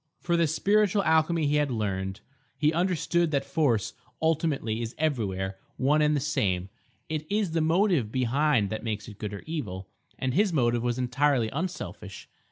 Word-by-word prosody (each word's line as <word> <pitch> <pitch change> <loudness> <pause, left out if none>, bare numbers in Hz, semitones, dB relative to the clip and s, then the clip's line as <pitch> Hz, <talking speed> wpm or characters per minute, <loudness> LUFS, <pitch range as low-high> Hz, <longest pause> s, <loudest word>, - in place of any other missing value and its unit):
For 175 -1 0
this 165 -2 +2
spiritual 205 0 +3
alchemy 160 -1 +2
he 145 +1 +2
had 150 -1 +1
learned. 95 -4 -2 0.4
He 150 +3 +2
understood 175 -1 +1
that 140 -3 0
force 135 - +1 0.3
ultimately 150 -8 0
is 115 0 -5
everywhere 100 -11 -1 0.2
one 145 +4 +3
and 150 0 +3
the - - +1
same; 100 -10 0 0.4
it 155 +1 -4
is 205 -4 +1
the 165 0 +1
motive 165 - +2
behind 130 -3 +1
that 110 - -4
makes 110 -3 -3
it 105 -2 -11
good 105 -2 -4
or 100 - -7
evil; 100 - -5 0.3
and 130 -1 -1
his 200 +4 +3
motive 120 -6 +2
was 120 0 -1
entirely 130 -1 +1
unselfish. 110 - -5
140 Hz, 170 wpm, -27 LUFS, 110-160 Hz, 0.4 s, spiritual